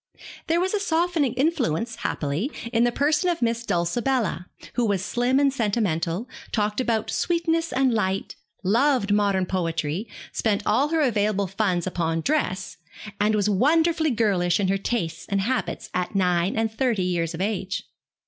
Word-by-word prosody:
There 330 +1 +2
was 375 +3 0
a 420 - +1
softening 330 - +1
influence, 245 - 0
happily, 155 - -2 0.2
in 230 +1 +4
the 240 - +2
person 300 +7 +2
of 340 -1 -1
Miss 230 0 0
Dulcibella, 200 - 0 0.3
who 245 - 0
was 200 -4 0
slim 245 +6 +1
and 280 -1 +3
sentimental, 205 -4 -1 0.2
talked 210 +2 0
about 230 -4 0
sweetness 330 -1 0
and 260 -1 +2
light, 195 -3 -1 0.3
loved 230 +1 +2
modern 200 -2 +2
poetry, 165 +1 -2 0.2
spent 205 -2 0
all 280 - +3
her 325 +1 +1
available 210 -6 +1
funds 190 -2 0
upon 165 -3 -1
dress, 200 - -1 0.4
and 210 +1 +3
was 205 -1 +1
wonderfully 315 - +3
girlish 195 -7 +1
in 195 -2 +1
her 195 0 +1
tastes 190 -6 -3
and 200 -1 +1
habits 255 +6 -2
at 180 +3 -2
nine 180 0 +1
and 225 -1 +1
thirty 230 -5 +1
years 170 -2 -1
of - - -8
age. 195 -2 -2
215 Hz, 160 wpm, -24 LUFS, 185-265 Hz, 0.4 s, in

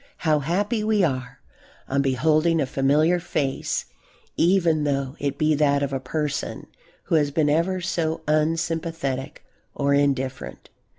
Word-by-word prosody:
How 155 -3 +2
happy 205 - -1
we 215 -2 +2
are 130 -6 -2 0.5
on 140 +1 +1
beholding 155 +5 +2
a 145 - +1
familiar 150 +7 +2
face 140 -5 -2 0.5
even 170 -3 +3
though 140 -1 -1
it 140 -1 -2
be 155 +1 +2
that 145 -1 +2
of 140 -1 -2
a 135 - -1
person 145 +2 -3 0.4
who - - -5
has 150 -3 +3
been 145 0 +1
ever 180 +4 +1
so 165 -3 -1
unsympathetic 155 -3 -1 0.3
or 140 0 +1
indifferent. 135 -2 -1
150 Hz, 135 wpm, -24 LUFS, 140-165 Hz, 0.5 s, even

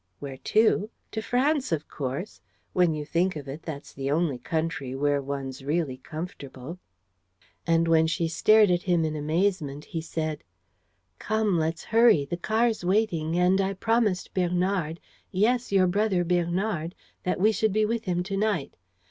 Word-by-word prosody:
"Where 135 -2 -7
to? 215 +4 +2 0.2
To 220 - -3
France, 265 - +1
of 155 -2 -1
course. 140 +8 -5 0.3
When 175 -3 +3
you 150 -1 -4
think 175 +4 +1
of 145 -2 -7
it, 140 +4 -6
that's 155 -3 -8
the 135 0 -3
only 150 -3 +1
country 155 -5 -3
where 145 +1 +1
one's 135 -1 -5
really 145 -2 -1
comfortable." 155 0 -8 0.9
And, 165 0 +3
when 160 -1 +4
she 165 +1 0
stared 210 +5 +5
at 175 0 +2
him 175 -3 +1
in 155 0 -2
amazement, 155 -1 -1
he 165 - -4
said: 155 -1 -4 0.8
"Come, 215 -5 +1
let's 160 +1 -1
hurry. 225 -10 +4
The 155 - -3
car's 220 +3 +1
waiting; 175 -4 +1
and 180 +2 +4
I 195 0 0
promised 225 -2 0
Bernard 180 -2 0 0.3
yes, 235 +6 +1
your 195 -2 +4
brother 190 0 +1
Bernard 175 0 -1 0.3
that 180 - -1
we 215 +4 +5
should 220 0 +1
be 215 +2 +2
with 230 +1 -2
him 180 -2 0
to 195 +2 -4
night. 200 -8 0
175 Hz, 160 wpm, -26 LUFS, 155-200 Hz, 0.9 s, stared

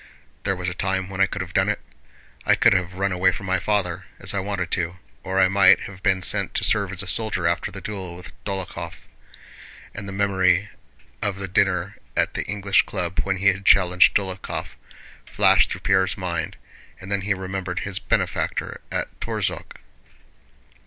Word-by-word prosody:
There 95 -1 +1
was 90 0 -4
a 90 - -1
time 95 0 -1
when 95 0 -2
I 100 - +6
could 100 - -4
have 90 -1 -11
done 95 +2 +3
it. 105 - 0 0.6
I - - +4
could - - +5
have 95 -1 -1
run 100 +1 0
away 95 0 +3
from 95 - -6
my 95 -1 +1
father, 95 -3 -1
as - - -2
I 100 - 0
wanted 95 -3 -3
to. 85 -1 -1 0.2
Or 95 0 -1
I 95 - +6
might 95 0 +6
have 95 -1 -9
been 95 -2 +2
sent - - +1
to - - +1
serve 100 -3 +2
as 95 +1 -1
a - - -9
soldier 100 -3 0
after 85 0 +1
the - - -9
duel 95 -5 -6
with 90 +1 -11
Dólokhov." 95 -3 -5 0.9
And 100 - -7
the - - -5
memory 95 0 +2 0.5
of 100 -2 0
the 100 -1 -5
dinner 95 0 +1 0.2
at - - +2
the - - -2
English 100 0 +2
Club 90 -3 -3
when 95 0 0
he 100 +2 +4
had 95 +1 -1
challenged 90 -1 +5
Dólokhov 95 -2 -2 0.5
flashed - - +4
through - - -5
Pierre's 95 -2 +2
mind, 85 -4 -3 0.4
and 95 +1 -9
then 100 0 +1
he 100 +1 0
remembered 95 -1 -4
his 95 -2 -2
benefactor - - -1
at - - -3
Torzhók. - - -3
95 Hz, 185 wpm, -23 LUFS, 90-100 Hz, 0.9 s, I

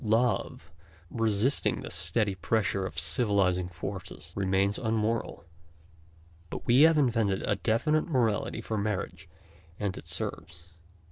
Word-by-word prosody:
Love, 110 -7 0 0.4
resisting 115 +3 +2
the - - -7
steady 105 -4 +1
pressure 95 +1 0
of - - -5
civilizing 90 -1 +2
forces, 90 +2 -7
remains 95 +1 +1
un 115 -2 -1
moral, 110 -4 -2 1.0
but - - -7
we 125 +4 +5
have 160 0 +6
invented 115 -8 +1
a - - +1
definite 150 +9 +1
morality 120 -9 0
for 110 -2 -3
marriage, 100 -2 -3 0.5
and 100 -3 -2
it - - -15
serves. 85 0 -5
105 Hz, 125 wpm, -29 LUFS, 95-115 Hz, 1.0 s, have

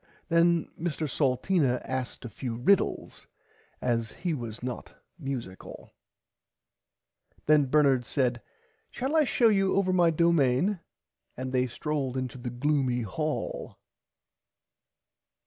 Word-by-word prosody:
Then 170 0 +3
Mr 160 -2 -2
Salteena 135 0 +1
asked 130 -1 -4
a - - -5
few 120 +1 -5
riddles 175 +12 +1 0.6
as 115 -2 0
he 175 -3 -2
was 120 -5 -6
not 125 -1 -6 0.2
musicle. 130 - -7 1.5
Then 150 -1 +5
Bernard 135 -3 +3
said 125 -2 0 0.5
shall 265 +5 -3
I 310 -2 +5
show 240 -2 +3
you 195 -2 +2
over 190 -1 +2
my 175 -2 +4
domain 170 +2 +2 0.6
and 130 +1 -4
they 130 0 +2
strolled 135 +1 -3
into 130 0 -4
the 120 - -4
gloomy 130 -1 0
hall. 155 +9 -4
140 Hz, 110 wpm, -28 LUFS, 125-170 Hz, 1.5 s, Then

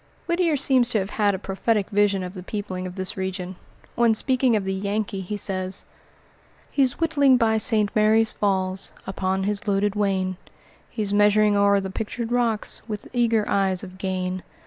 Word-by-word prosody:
Whittier 340 -3 +1
seems 260 -3 +3
to 230 - +1
have 195 0 -2
had 205 -2 +1
a - - -3
prophetic 200 +2 -1
vision 200 -2 +2
of 180 0 -6
the 185 - -8
peopling 185 -1 -5
of 180 - -9
this 190 +3 -2
region. 190 -1 -4 0.4
When 235 -2 +3
speaking 255 0 +2
of 205 -2 -1
the 190 - -1
Yankee, 200 0 -2
he 205 +3 -5
says: 185 -1 -2 0.9
"He's 265 -3 +1
whittling 285 -5 +4
by 225 -2 +2
St. 215 -1 +3
Mary's 220 +1 +4
Falls, 190 -1 -1
Upon 190 0 -2
his 205 +1 -1
loaded 200 0 +1
wain; 190 -3 0 0.5
He's 210 -3 -3
measuring 210 0 +4
o'er 200 0 +4
the 190 -1 -5
Pictured 225 +3 -4
Rocks, 235 -3 +1
With 210 -2 -6
eager 230 -3 +2
eyes 190 -2 0
of 185 -1 -10
gain. 185 -1 -3
205 Hz, 170 wpm, -23 LUFS, 190-225 Hz, 0.9 s, whittling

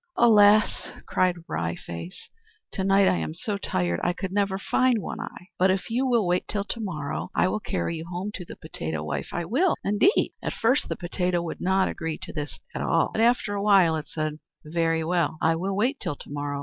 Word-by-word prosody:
"Alas," 215 -2 +5 0.2
cried 185 -1 +2
Wry 85 +1 -2
Face, 85 +1 -8 0.4
"to 190 - -2
night 195 0 +4
I 185 -1 +3
am 155 - -3
so 205 +2 -3
tired 85 - -1
I 175 - +2
could 185 +1 -5
never 195 -1 +1
find 255 +5 +2
One - - -5
Eye; 180 - -8
but 185 +1 +5
if 190 +4 -1
you 255 +3 +1
will 240 -3 +3
but 175 - -1
wait 180 +1 +1
till 205 -2 -2
to 230 - -5
morrow, 160 -9 -4
I - - +3
will 215 - -1
carry 170 -4 -2
you 160 - -6
home 180 +4 -4
to 180 - -6
the - - -10
potato 80 - -5
wife 75 -2 -3
I 175 - -2
will 310 - +2
indeed!" 210 - +3
At - - -3
first 255 +6 +1
the - - -1
potato 175 0 -1
would 170 - -6
not 190 +1 +2
agree 160 -1 -3
to - - -8
this 145 -1 -5 0.2
at - - -3
all, 165 -1 +2
but 220 - 0
after 235 -2 +3
a 200 - -2
while 195 -6 +5
it 155 -2 -4
said, 155 -1 -3 0.3
"Very 165 0 0
well, 165 -2 0
I 165 0 +3
will 190 +4 -2
wait 250 +8 +1
till 145 - -3
to - - -12
morrow. 145 0 -3
180 Hz, 225 wpm, -26 LUFS, 160-205 Hz, 0.4 s, Alas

